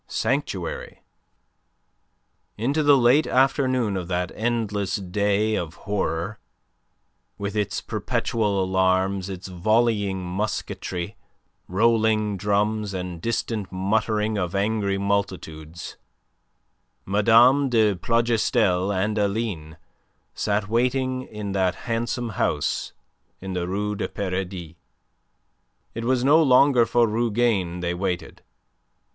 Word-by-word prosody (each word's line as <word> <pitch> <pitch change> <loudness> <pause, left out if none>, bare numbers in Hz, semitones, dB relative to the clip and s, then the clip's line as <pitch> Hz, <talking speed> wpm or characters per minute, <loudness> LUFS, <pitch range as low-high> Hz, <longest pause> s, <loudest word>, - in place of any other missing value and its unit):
SANCTUARY - - -3 1.5
Into 135 +8 0
the 145 -2 +6
late 130 +5 +4
afternoon 130 -5 +2
of 90 -2 -4
that 90 0 -2
endless 105 -4 -1
day 100 +3 0
of 85 -5 -3
horror 100 0 -3 1.0
with 100 +1 -4
its 105 -2 -1
perpetual 105 -4 -1
alarms, 95 +1 +1
its 95 -1 -7
volleying 100 0 +1
musketry, 95 0 -4 0.5
rolling 110 +1 +2
drums, 105 +1 0
and 90 -2 -5
distant 110 -3 -2
muttering 105 +2 0
of 90 0 -2
angry 100 -1 0
multitudes, 90 -5 -3 1.1
Mme. 115 +7 +5
de 110 -4 +3
Plougastel 110 -2 +1
and 105 +2 0
Aline 100 -7 -2 0.6
sat 100 -1 -1
waiting 130 +3 0
in 105 -2 -6
that 95 -2 +1
handsome 120 0 -2
house 105 - -1 0.5
in 95 0 -6
the 90 -1 -2
Rue 105 +3 -2
du - - -2
Paradis. 90 -4 -4 1.2
It 115 +1 -5
was 125 0 +1
no 150 +5 +6
longer 130 -3 +5
for 120 -1 +3
Rougane 110 -5 0
they 85 0 -1
waited. 90 -2 -3
105 Hz, 105 wpm, -24 LUFS, 95-115 Hz, 1.5 s, the